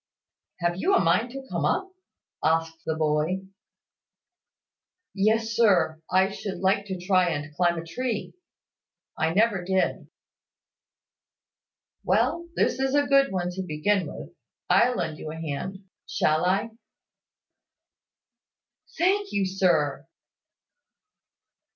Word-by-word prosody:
"Have 175 0 0
you 385 - +2
a - - +5
mind 180 +9 +2
to 270 +2 -8
come - - -1
up?" 380 -1 0 0.5
asked 165 0 +1
the 160 - 0
boy. 155 +4 0 1.7
"Yes, 220 +3 +1
sir, 185 -8 +3
I 190 +1 +3
should 195 -1 -5
like 195 +1 +1
to 190 -2 -4
try 180 0 +2
and 150 -1 -4
climb 175 +1 +1
a 165 - -5
tree. 230 +5 -3 0.8
I 160 0 0
never 205 0 +2
did." 190 +1 0 2.0
"Well, 340 0 +1
this - - +1
is 270 +1 +1
a 290 0 +3
good 275 -1 +4
one 180 -2 -2
to 190 +1 -4
begin 185 +4 0
with. - - -9 0.4
I'll 245 +1 +4
lend 160 -4 -3
you 155 - -6
a - - -7
hand; 165 +6 -5 0.2
shall 155 +3 +1
I?" 200 +5 +1 2.3
"Thank 390 +4 +1
you, 200 -1 +1
sir." 165 -6 +1
190 Hz, 120 wpm, -26 LUFS, 165-225 Hz, 2.3 s, a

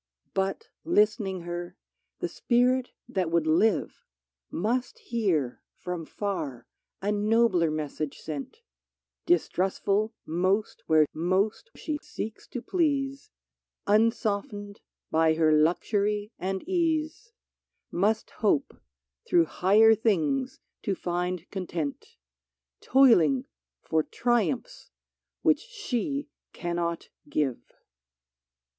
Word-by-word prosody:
" - - -48
But 195 - -1
list'ning 210 - +2
her, 175 +1 -5 0.4
the - - 0
spirit 250 +1 +2 0.2
that 190 -8 -1
would 165 -1 +2
live 175 +7 +2 0.5
Must 240 - -1
hear, 195 - -1
from 175 -3 -5
far, 145 - -4 0.4
a 205 - +1
nobler 210 -4 +3
message 155 -1 -3
sent: 155 - -7 0.6
Distrustful 210 - +1
most 185 +6 0
where 155 -1 +5
most 190 - 0
she 300 -2 -3
seeks 220 0 -7
to 245 - -6
please, 280 - 0 0.6
84 205 - +3
PHILISTIA - - +8
Unsoftened 205 -3 -1 0.3
by 160 0 +4
her 160 -1 +3
luxury 205 +7 +1
and 190 - -3
ease, 335 +4 0 0.6
Must 210 +5 +1
hope 205 -10 0 0.5
through 170 -1 +4
higher 210 +7 +5
things 225 - 0 0.2
to 200 -4 -1
find 180 0 -2
con 190 -3 -4
tent, 150 -5 -4 0.3
— 65 0 -60
Toiling 180 - +6 0.4
for 160 - +2
triumphs 240 - -1 0.5
which - - +4
she 300 - -3 0.3
cannot 170 -1 -3 0.2
give 135 -5 0
200 Hz, 105 wpm, -27 LUFS, 170-240 Hz, 0.6 s, PHILISTIA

